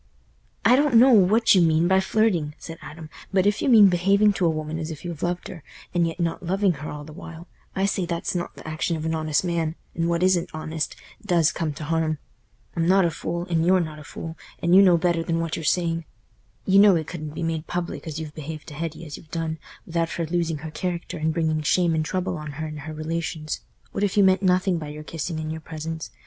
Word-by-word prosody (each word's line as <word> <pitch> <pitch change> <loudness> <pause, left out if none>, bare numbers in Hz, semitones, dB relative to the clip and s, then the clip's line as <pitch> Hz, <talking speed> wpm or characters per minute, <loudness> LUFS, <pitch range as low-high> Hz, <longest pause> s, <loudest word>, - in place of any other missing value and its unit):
"I 245 - +7
don't 285 -2 +3
know 255 +4 +8
what 220 +1 +5
you 185 - +5
mean 165 0 +3
by 190 +1 +4
flirting," 190 -7 +1
said 165 -1 -9
Adam, 155 -1 -10 0.2
"but 190 -1 +2
if 205 +1 +2
you - - +1
mean 215 -5 +8
behaving 195 +3 +4
to 185 -3 +1
a - - +4
woman 155 0 -3
as 160 0 -4
if 160 +1 -8
you 170 -1 -4
loved 175 0 -2
her, 165 - -9 0.3
and 170 -1 +2
yet 165 +2 -6
not 170 -1 -1
loving 190 +2 +2
her 150 - -5
all 150 0 -6
the 155 +1 -11
while, 165 +2 -10 0.3
I 195 - +1
say 190 -3 0
that's 170 -1 -2
not 175 -1 -4
th' - - -10
action 155 +1 -1
of 155 - -5
an 160 - 0
honest 155 -1 0
man, 165 -2 -1 0.2
and 165 0 -1
what 170 +1 +1
isn't 185 -2 +2
honest 155 0 -3 0.3
does 170 -6 +3
come 160 -2 -2
t' 150 - -8
harm. 160 0 0 0.6
I'm 165 0 +1
not 190 0 +5
a 170 - +1
fool, 170 +2 -4
and 165 -2 +1
you're 185 +2 +4
not 155 -3 -4
a - - -10
fool, 160 +2 -7 0.2
and 170 +1 +3
you 195 - +9
know 180 -3 +6
better 170 -1 +1
than 165 0 -1
what 165 -1 -2
you're 165 - -5
saying. 165 0 0 0.6
You 195 +1 +5
know 200 -2 +7
it 160 -2 -1
couldn't 155 -2 -7
be 170 - -3
made 165 -1 -2
public 175 -1 -4
as 155 -1 -4
you've 155 -2 -6
behaved 155 0 -7
to - - -10
Hetty 165 +2 -5
as 150 - -7
y' - - -12
have 160 - -21
done 160 -1 -3 0.3
without 165 0 -1
her 170 - -2
losing 165 -1 -1
her 155 - -5
character 175 0 -4
and 160 +1 +1
bringing 160 -1 0
shame 170 +2 +2
and 160 -1 +1
trouble 185 +2 -2
on 150 -1 -7
her 155 +3 -4
and 155 -1 -6
her 155 +2 -7
relations. 155 0 -3 0.3
What 200 - -2
if 205 0 0
you 200 - +7
meant 190 0 +4
nothing 185 -1 +2
by 155 - -6
your 150 +1 -8
kissing 160 +1 -4
and 155 0 -4
your 160 0 -5
presents? 160 0 -6
165 Hz, 245 wpm, -24 LUFS, 155-180 Hz, 0.6 s, you